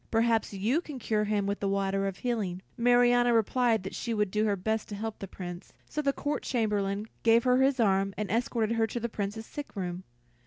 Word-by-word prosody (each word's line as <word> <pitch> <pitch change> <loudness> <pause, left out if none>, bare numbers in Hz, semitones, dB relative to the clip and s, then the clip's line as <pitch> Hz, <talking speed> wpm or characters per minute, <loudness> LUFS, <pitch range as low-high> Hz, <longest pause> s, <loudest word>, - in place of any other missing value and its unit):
Perhaps 225 0 +2
you 215 - 0
can 300 -5 -8
cure 215 -3 0
him 205 -1 0
with 200 +1 -2
the 200 - -1
water 195 0 0
of 195 -1 -4
healing." 200 -7 -2
Marianna 245 0 +4
replied 225 -1 +2
that 190 - -6
she 235 -2 -3
would 210 -3 0
do 215 +1 +1
her 205 -2 +2
best 220 +3 -2
to 205 - -5
help 220 +1 -5
the 195 - -6
Prince; 175 -1 -8
so 300 - -2
the 280 -2 +2
Court 290 +1 -2
Chamberlain 210 -4 -1 0.2
gave 230 0 +5
her 250 0 +4
his 270 -1 +3
arm, 195 -3 +3
and 205 -3 -3
escorted 230 -1 0
her 225 0 +3
to 240 - -4
the 235 +1 -3
Prince's 210 +1 -4
sick 290 +1 -8
room. 180 -2 -4
220 Hz, 220 wpm, -29 LUFS, 195-240 Hz, 0.2 s, gave